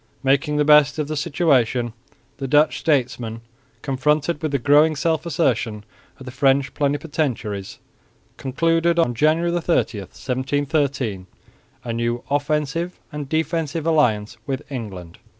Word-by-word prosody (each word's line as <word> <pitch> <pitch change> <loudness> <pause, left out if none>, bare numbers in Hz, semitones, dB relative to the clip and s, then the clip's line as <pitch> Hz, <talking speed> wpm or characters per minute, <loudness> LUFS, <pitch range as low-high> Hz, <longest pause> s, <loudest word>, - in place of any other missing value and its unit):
Making 140 +3 +2
the 150 - +2
best 150 0 +5
of 150 -2 -1
the 155 - -3
situation, 135 -7 +1 0.4
the 135 - -4
Dutch 150 +3 +3
statesmen, 120 -6 -1 0.4
confronted 150 +3 0
with 155 -2 -2
the 140 - +2
growing 145 +4 +4
self 160 +2 0
assertion 115 -9 0 0.3
of 130 - -12
the 130 - -7
French 135 +1 +2
plenipotentiaries, 140 -9 -2 0.6
concluded, 165 +5 +1
on 165 -8 +2
January 155 +7 +2
30, 170 -10 0
1713, 130 - -2 0.6
a 115 - -4
new 120 +1 -2
offensive 150 +4 -1
and 150 -2 -6
defensive 160 0 -1
alliance 120 -9 +1
with 135 -2 -3
England. 95 -9 -7
145 Hz, 125 wpm, -22 LUFS, 125-155 Hz, 0.6 s, best